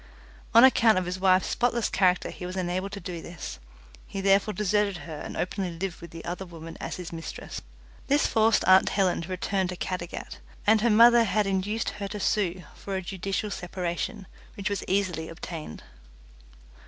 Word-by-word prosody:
On 230 - +10
account 230 -5 +6
of 185 - 0
his 180 +1 -4
wife's 185 0 +4
spotless 240 -1 +1
character 180 -2 +2
he - - -10
was 180 - -6
unable 185 +1 -2
to 200 0 -7
do 175 -4 -6
this; 150 - -8 0.5
he 195 - -5
therefore 195 +2 +3
deserted 210 -1 +1
her 155 -3 -7
and - - -7
openly 185 0 -2
lived 185 -1 -4
with 170 - -9
the 165 +1 -10
other 180 +2 -4
woman 165 -2 -10
as - - -4
his 180 -2 -7
mistress. 165 -1 -7 0.5
This 285 +2 +3
forced 220 -1 +3
aunt 185 0 +6
Helen 190 -4 +1
to 170 - -7
return 185 +1 -1
to 180 - -4
Caddagat, 180 -1 -5 0.3
and 215 0 +5
her 235 - +3
mother 235 +2 +7
had 210 -1 +1
induced 195 +3 -1
her 200 -1 -5
to 210 +1 -6
sue 185 -3 0
for 195 - -6
a 190 - -2
judicial 195 +3 -3
separation, 180 +4 -4 0.3
which 200 +1 -3
was 200 - -2
easily 185 -5 0
obtained. 165 - -7
190 Hz, 180 wpm, -27 LUFS, 175-210 Hz, 0.5 s, On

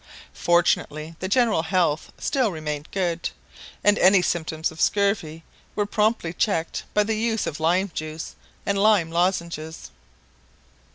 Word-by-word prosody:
Fortunately 165 -2 +1
the 185 - -3
general 225 -3 +3
health 165 -3 0
still 260 -7 0
remained 150 -2 -5
good, 175 -3 -1 0.5
and 205 0 +4
any 185 0 +6
symptoms 160 -2 -1
of 160 - -8
scurvy 200 -6 +1 0.3
were 205 - +1
promptly 210 -5 0
checked 170 -3 -1
by 210 - +5
the 220 +2 -1
use 225 0 0
of 145 - -4
lime 180 +4 +1
juice 155 +1 -5 0.3
and 200 0 0
lime 200 -6 +4
lozenges. 170 -2 -2
175 Hz, 130 wpm, -24 LUFS, 160-205 Hz, 0.5 s, any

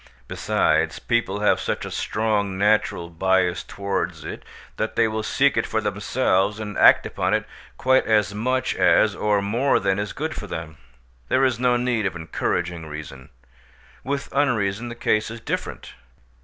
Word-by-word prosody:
Besides, - - +1
people 105 -4 -1
have 105 - +3
such - - -3
a - - -7
strong 105 -3 -1
natural 105 -4 +1
bias 90 +1 +1
towards 90 -5 -3
it - - -7 0.4
that 110 - -2
they 115 -1 +3
will 110 0 -2
seek 135 +5 +2
it - - +1
for 110 - 0
themselves 105 0 0
and 105 -2 -5
act - - +7
upon - - 0
it - - -2 0.3
quite 130 0 +3
as 105 -2 +2
much 130 +5 0
as - - +4
or 105 -1 +1
more 120 +7 +2
than 95 +1 0
is 105 0 -3
good 155 +2 -4
for 105 - -7
them: 80 -4 -6 0.5
there 135 +1 +3
is 125 -3 0
no 125 -1 +3
need 120 -4 0
of 95 - -5
encouraging 85 0 -3
reason. 75 -4 -9 0.7
With 140 +1 -3
unreason 120 -5 0
the 120 - -7
case 110 -2 0
is 115 0 -7
different. - - -5
105 Hz, 165 wpm, -23 LUFS, 95-120 Hz, 0.7 s, act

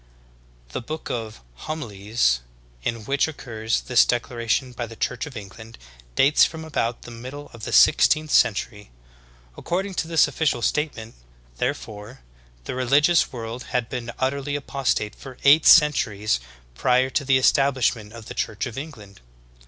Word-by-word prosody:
'" - - -31
The - - -3
"Book 155 +6 -6
of 110 -2 -5 0.3
Homilies," 105 - 0 0.4
in 115 - -3
which 140 +5 +1
occurs 115 -7 -3
this 125 -2 +4
declaration 120 +1 -1
by 120 -1 -5
the 115 - -11
Church 125 +4 -3
of 135 -5 -9
England, 110 +3 -11 0.4
dates 140 +3 +5
from, 160 -1 -1
about 120 -6 -2
the 120 - -10
middle 130 +5 -9
of 115 -2 -9
the - - -5
sixteenth 155 -1 +4
century. 105 -2 +1 0.7
According 190 +3 -3
to 160 - -8
this 165 -2 +4
official 145 -4 -1
statement, 125 -7 -2 0.4
therefore, 105 - -5 0.4
the - - -5
religious 140 +7 +3
world 120 0 -6
had 125 -2 0
been 120 -2 -5
utterly 140 +2 -1
apostate 135 -6 -1
for 130 -2 -12
eight 145 +3 +6
centuries 110 - +4 0.3
prior 125 - +2
to 140 - 0
the 135 -1 +3
establishment 130 -5 +2
of 115 -1 -11
the - - -7
Church 110 -1 -3
of 125 0 -5
England. 110 - -11
125 Hz, 150 wpm, -23 LUFS, 110-140 Hz, 0.7 s, eight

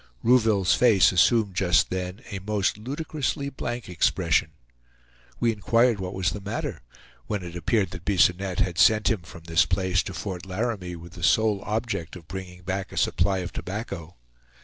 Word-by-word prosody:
Rouville's 110 -6 +4
face 110 -7 +5
assumed 100 +2 +3
just 90 -2 +3
then 90 +3 -4
a 100 - -4
most 100 0 0
ludicrously 140 +4 -3
blank 120 -3 -5
expression. 90 -3 +1 0.9
We 115 - +3
inquired 115 +2 +2
what 95 0 -5
was 95 0 0
the 105 - -6
matter, 100 - -4 0.5
when 105 -3 -2
it 85 -1 -8
appeared 95 +2 0
that 90 -2 -8
Bisonette 95 -1 +2
had 90 -2 -1
sent 110 +1 +5
him 110 -5 -1
from 80 0 -13
this 80 0 +2
place 95 0 +1
to 95 - -7
Fort 90 -4 -5
Laramie 95 -2 -3
with 85 0 -11
the 90 - -10
sole 105 +2 +3
object 105 -6 -2
of 85 -3 -12
bringing 90 -2 -8
back 95 +1 -3
a - - -9
supply 95 +2 +2
of 85 - -7
tobacco. 90 -4 -6
95 Hz, 170 wpm, -25 LUFS, 90-110 Hz, 0.9 s, face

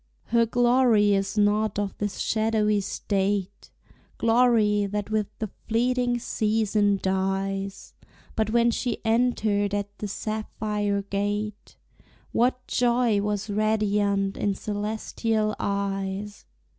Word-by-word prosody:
Her 230 0 +3
glory 240 -3 +4
is 195 +1 -1
not 210 0 +2
of 205 -1 -2
this 205 -1 -2
shadowy 215 -1 +1
state, 200 0 -2 0.5
Glory 225 -3 +3
that 205 +1 -4
with 215 -2 +1
the 215 -3 -4 0.2
fleeting 245 +1 +1
season 210 -3 +1
dies; 195 +1 -2 0.4
But 220 -1 0
when 235 +1 +3
she 235 -1 -3
entered 220 -3 +1
at 205 0 -4
the 210 - -3
sapphire 210 -1 -2
gate 205 +1 -3 0.6
What 250 +1 +1
joy 240 -3 +2
was 210 0 -2
radiant 205 -2 +1
in 200 -1 0
celestial 215 +1 -2
eyes! 200 0 -3
210 Hz, 105 wpm, -25 LUFS, 200-225 Hz, 0.6 s, glory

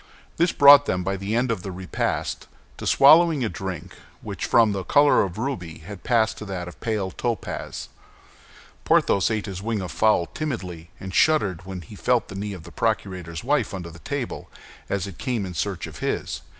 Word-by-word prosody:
This 170 +1 +3
brought 145 0 +8
them, 90 0 0
by 95 +2 -1
the 100 +3 -3
end 120 +1 +1
of 110 - -2
the 95 - -6
repast, 90 0 -3 0.3
to - - -5
swallowing 155 -1 +6
a - - -1
drink 95 -2 -6 0.3
which - - -4
from 115 -2 +5
the 95 -2 -3
color 145 +8 +5
of 95 -3 -2
the 110 - -5
ruby 90 -12 -4
had 100 -1 -9
passed 115 -2 +2
to 105 - -7
that 90 -3 -5
of 90 - -8
a - - -25
pale 105 -5 -2
topaz. 120 +2 -4 1.0
Porthos 100 0 +3
ate 110 -2 -1
his 95 -3 -6
wing 110 0 -2
of 90 -2 -5
the - - -11
fowl 110 -5 +4
timidly, 90 - -5
and 95 0 -7
shuddered 95 - +2
when 95 -2 -6
he 90 +6 -12
felt 120 +2 +1
the 95 - -8
knee 100 +1 -4
of 90 -4 -9
the 85 - -12
procurator's 90 -6 -2
wife 130 -6 0
under 85 -2 -7
the 85 - -13
table, 140 +4 -5 0.4
as 100 -2 -1
it 100 -3 -9
came 120 -6 -1
in 90 - -6
search 95 +1 -2
of - - -10
his. - - -2
100 Hz, 205 wpm, -24 LUFS, 90-120 Hz, 1.0 s, brought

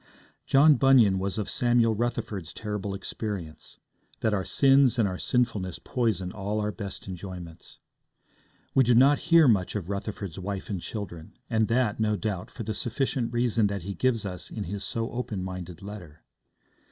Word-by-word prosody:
John 145 +1 +6
Bunyan 120 -8 +5
was 95 +1 -2
of 105 - -2
Samuel 120 -2 +3
Rutherford's 110 -6 -3
terrible 105 -2 -4
experience, 95 -7 -6 0.4
that 110 - +1
our 95 -2 0
sins 135 0 +4
and 110 -4 +3
our 90 -1 -4
sinfulness 110 -8 0
poison 105 -7 -1
all 105 +2 -3
our 105 0 -1
best 100 -2 -7
enjoyments. 90 -3 -8 1.0
We 135 - +5
do 120 0 +4
not 140 +4 +6
hear 165 -3 +7
much 100 -6 +2
of 100 -2 -3
Rutherford's 100 -3 -5
wife 95 +2 -5
and 95 -4 -3
children, 85 -7 -7
and 110 -1 +2
that, 115 -3 +1
no 105 -1 +2
doubt, 105 -4 -3
for 115 - -7
the 110 +1 -3
sufficient 125 +1 -1
reason 120 -3 +2
that 100 -3 -4
he 100 +2 -4
gives 115 -1 0
us 90 -2 -5
in 105 - -5
his 100 +2 -5
so 115 0 -3
open 115 -6 -4
minded 90 -2 -7
letter. 95 -7 -10
105 Hz, 165 wpm, -27 LUFS, 95-120 Hz, 1.0 s, hear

